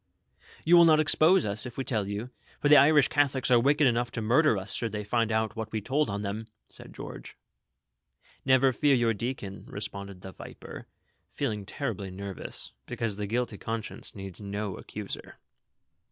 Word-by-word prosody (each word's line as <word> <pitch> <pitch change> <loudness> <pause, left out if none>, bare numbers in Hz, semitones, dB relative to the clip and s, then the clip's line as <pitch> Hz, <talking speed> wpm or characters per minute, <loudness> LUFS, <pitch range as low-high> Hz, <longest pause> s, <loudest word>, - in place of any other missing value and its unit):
" - - -24
You 175 +2 +7
will 170 - +8
not 155 -2 +6
expose 160 +4 +4
us, 105 +3 -1
if 120 - -11
we 135 - -1
tell 110 -6 -1
you; 105 +5 -4 0.3
for 145 - +1
the 150 - +9
Irish 145 -2 +6
Catholics 135 -3 +1
are 120 - +7
wicked 145 +4 +3
enough 120 -1 +2
to - - -3
murder 125 +2 +4
us, 95 +1 -6
should 115 -3 -3
they 105 0 -3
find 115 +2 0
out 110 -1 0
that 110 -1 -5
we 110 - -1
told 135 +7 0
on 100 +1 -3
them," 105 +2 -4 0.2
said - - -11
George. - - -9 1.1
"Never 130 0 +4
fear 145 +1 +3
your 120 -2 +2
deacon," 105 -3 -5
responded 100 -2 -7
the 95 - -8
viper, - - -10 0.5
feeling 105 -2 -2
terribly 110 -9 -4
nervous, 95 -7 -6 0.2
because 110 -3 -3
the 105 -1 -3
guilty 115 -2 -2
conscience 110 -1 -4
needs 95 -1 -8
no 100 -1 -4
accuser. - - -8
115 Hz, 180 wpm, -28 LUFS, 100-135 Hz, 1.1 s, the